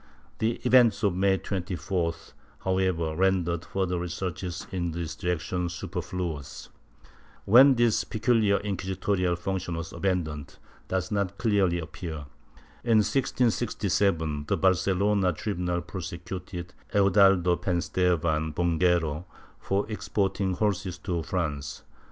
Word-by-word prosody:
^ - - -31
The 110 +2 +2
events 125 -4 +5
of 100 -3 +3
May 95 +1 +2
24th, 90 -3 -3 0.3
however, 95 -4 0
rendered 90 -2 +1
further 95 -2 -1
researches 90 0 -4
in 85 -3 -2
this 85 -1 -4
direction 90 0 -2
superfluous. 85 -3 -5 0.8
When 130 +6 +8
this 120 -2 +3
peculiar 110 -3 +2
inquisitorial 95 -2 -1
function 90 0 -3
was 85 0 -6
abandoned, 80 -7 -2 0.3
does 95 +4 -2
not 100 -2 -1
clearly 100 -7 +2
appear. 80 -2 -6 0.6
In 115 -3 +4
1667 100 - 0
the 100 - +1
Barcelona 95 +1 +2
tribunal 90 -2 -2
prosecuted 90 -1 -7 0.2
Eudaldo 95 -3 +5
Penstevan 85 -3 0
Bonguero 85 -2 +1 0.3
for 100 +1 0
exporting 95 -3 -1
horses 95 -3 -1
to 90 -2 -2
France. 75 -5 -3
90 Hz, 105 wpm, -27 LUFS, 85-100 Hz, 0.8 s, When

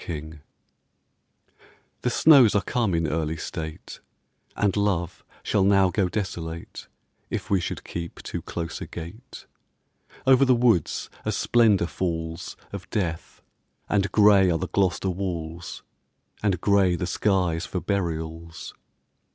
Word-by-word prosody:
PLOUGH 80 -1 -6 1.6
The 125 - +1
snows 130 -4 +6
are 105 - +2
come 110 -8 0
in 85 0 +1
early 80 +1 -1
state, 80 0 -7 0.6
And 100 -2 +1
love 100 -5 -1 0.2
shall 100 - +2
now 95 -1 +4
go 95 -2 +1
desolate 85 -5 -5 0.4
If - - -4
we 95 -2 +3
should - - -4
keep 85 -1 -6
too - - -5
close 85 -1 -5
a - - -5
gate. 100 +10 -9 0.8
Over 130 0 +6
the 130 -2 +5
woods 115 -7 +1
a - - -1
splendour 110 -7 +3
falls 80 0 -4 0.2
Of 100 0 -7
death, 85 -6 -3 0.4
and 100 -2 +1
grey 100 -3 +6
are 85 - +2
the 90 +2 -4
Gloucester 95 -1 +1
walls, 85 -2 -5 0.6
And 100 -5 +1
grey 100 -3 +3
the 90 - -2
skies 90 -3 0
for 90 - -3
burials. 85 -4 -4
90 Hz, 130 wpm, -25 LUFS, 85-100 Hz, 1.6 s, snows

